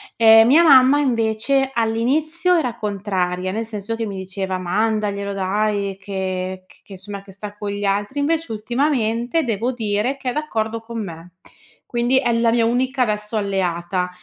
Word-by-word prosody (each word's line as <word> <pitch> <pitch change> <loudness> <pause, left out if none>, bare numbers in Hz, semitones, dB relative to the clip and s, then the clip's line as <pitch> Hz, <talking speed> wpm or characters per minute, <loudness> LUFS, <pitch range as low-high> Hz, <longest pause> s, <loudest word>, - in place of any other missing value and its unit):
Ehm, 225 0 +7
mia 305 +7 +6
mamma 275 -2 +6
invece 260 +1 +1
all'inizio 295 +10 +1
era 250 -8 -1
contraria, 185 -3 -2
nel 220 +3 -3
senso 215 0 -5
che 225 0 -3
mi 200 -2 -5
diceva: 190 0 -4
"Mandaglielo 200 +1 -1
dai 200 0 -1
che 185 -1 -4
c - - -23
che - - -20
insomma 195 +1 -8
che 195 -1 -14
sta 205 +1 -9
con 205 -1 -4
gli 205 0 -4
altri." 205 +7 -1
Invece 325 +1 0
ultimamente, 240 +4 0
devo 235 +1 -1
dire, 225 +3 -1
che 260 - -3
è 245 - -2
d'accordo 230 -7 -2
con 225 -1 -5
me. 170 -1 -9 0.6
Quindi 240 +2 +2
è 265 - 0
la 230 0 +2
mia 230 -1 +2
unica, 255 +2 +1
adesso, 210 -1 -2
alleata 180 -2 -1
220 Hz, 165 wpm, -20 LUFS, 195-245 Hz, 0.6 s, Ehm